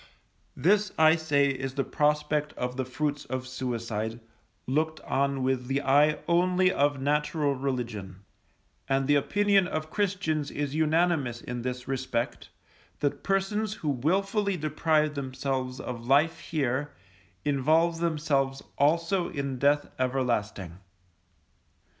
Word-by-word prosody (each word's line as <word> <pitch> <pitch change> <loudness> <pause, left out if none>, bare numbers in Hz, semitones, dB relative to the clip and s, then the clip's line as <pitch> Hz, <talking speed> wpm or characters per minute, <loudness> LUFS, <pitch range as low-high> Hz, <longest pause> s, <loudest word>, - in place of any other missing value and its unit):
This 200 +7 +2
I 160 0 +6
say 145 -4 +2
is 135 0 -3
the 140 - +1
prospect 150 +1 0
of 125 0 -3
the 130 0 -2
fruits 145 +3 -2
of 130 0 -4
suicide, 115 -3 -3 0.5
looked 155 +4 0
on 140 -1 0
with 130 -1 0
the 135 +2 0
eye 145 +3 +4
only 180 +2 +3
of 145 0 +1
natural 150 +1 +1
religion; 120 -8 -4 0.7
and 135 0 +2
the 145 - +3
opinion 200 +6 +3
of 155 -2 -4
Christians 185 -8 -1
is 145 -1 -3
unanimous 155 -5 +1
in 120 0 -5
this 125 +1 -4
respect, 130 -3 -3 0.5
that 145 -1 0
persons 200 +2 0
who 155 - -3
wilfully 195 - 0
deprive 155 0 +1
themselves 130 -2 -3
of 120 -1 -6
life 155 +5 +3
here, 145 -1 -2 0.5
involve 160 +4 +2
themselves 145 -5 0 0.2
also 170 +5 +2
in 140 -4 -4
death 145 +2 +3
everlasting. 110 -9 -1
145 Hz, 125 wpm, -28 LUFS, 130-160 Hz, 0.7 s, I